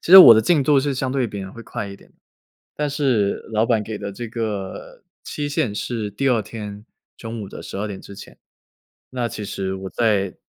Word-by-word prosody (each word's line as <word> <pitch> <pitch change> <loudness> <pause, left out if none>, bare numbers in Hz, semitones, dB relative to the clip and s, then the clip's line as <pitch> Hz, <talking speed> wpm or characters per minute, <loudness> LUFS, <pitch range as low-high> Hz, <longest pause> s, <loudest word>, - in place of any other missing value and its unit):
其 175 - -1
实 190 - +14
我 115 -11 +12
的 110 - +5
进 150 +4 +3
度 145 0 +4
是 140 0 -1
相 130 0 -1
对 130 -3 +1
别 100 -2 -6
人 95 0 -7
会 115 - -10
快 100 - -5
一 100 - -9
点 - - -21
的。 - - -33 0.6
但 150 0 0
是 130 -9 +1 0.2
老 110 +1 +3
板 115 -3 +2
给 110 -1 -5
的 100 -1 -5
这 120 +2 -6
个 105 -5 -5 0.2
期 145 0 -3
限 125 -7 0
是 110 -2 -3
第 135 +7 0
2 115 -4 +3
天 105 -1 -8 0.3
中 115 -1 -6
午 100 - -6
的 - - -9
12 100 +2 -4
点 95 -2 -6
之 100 - -11
前。 - - -12 0.7
那 125 -2 -2
其 105 0 -6
实 95 -1 -3
我 95 0 -6
在 100 -5 +1
110 Hz, 230 characters per minute, -22 LUFS, 100-125 Hz, 0.7 s, 实